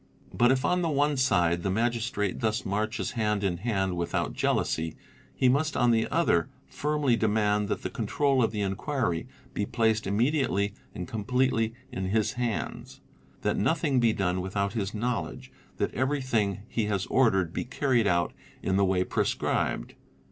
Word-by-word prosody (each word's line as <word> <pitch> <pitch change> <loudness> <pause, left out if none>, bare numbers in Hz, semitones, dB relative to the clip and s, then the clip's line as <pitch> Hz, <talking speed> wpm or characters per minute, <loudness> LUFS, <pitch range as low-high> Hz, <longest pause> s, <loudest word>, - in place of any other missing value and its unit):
But 120 +1 +4
if 130 -1 +1
on 180 0 +2
the 170 - 0
one 145 0 +2
side 85 -10 +2
the 95 - -1
Magistrate 115 -2 -1
thus 110 +2 -1
marches 110 +4 -1
hand 105 -4 0
_ - - +1
in 90 -3 0
hand 95 -3 -1
without 85 -1 -1
jealousy, 80 0 0 0.4
he 130 - +3
must 145 +4 +2
on 120 0 +4
the 115 -1 +2
other 150 - +2 0.2
firmly 150 -4 0
demand 105 -2 +1
that - - -1
_ - - -22
the - - -2
control 140 -3 +1
of 115 - +2
the 105 -2 -2
inquiry 100 - -1 0.3
be 100 - -2
placed 110 -3 +1
immediately 105 -2 +1 0.2
and 90 -3 -5
completely 115 0 0 0.2
in 95 - -3
his 105 +5 +1
hands; 120 -3 -3 0.4
that - - +1
nothing 145 +2 +2
be 115 -2 +4
done 95 -3 0
without 100 +2 -2
his 100 -2 -2
knowledge, 120 +2 -3 0.3
and - - 0
that - - -24
every 135 +4 +1
thing 105 -6 0
he 115 -3 -1
has 100 -2 -1
ordered 95 -10 +2
be - - -2
carried 125 -3 +1
out 85 -3 +1 0.3
in 95 0 +1
the 100 - +4
way 95 -1 +2
prescribed. - - -1
110 Hz, 175 wpm, -28 LUFS, 95-130 Hz, 0.4 s, But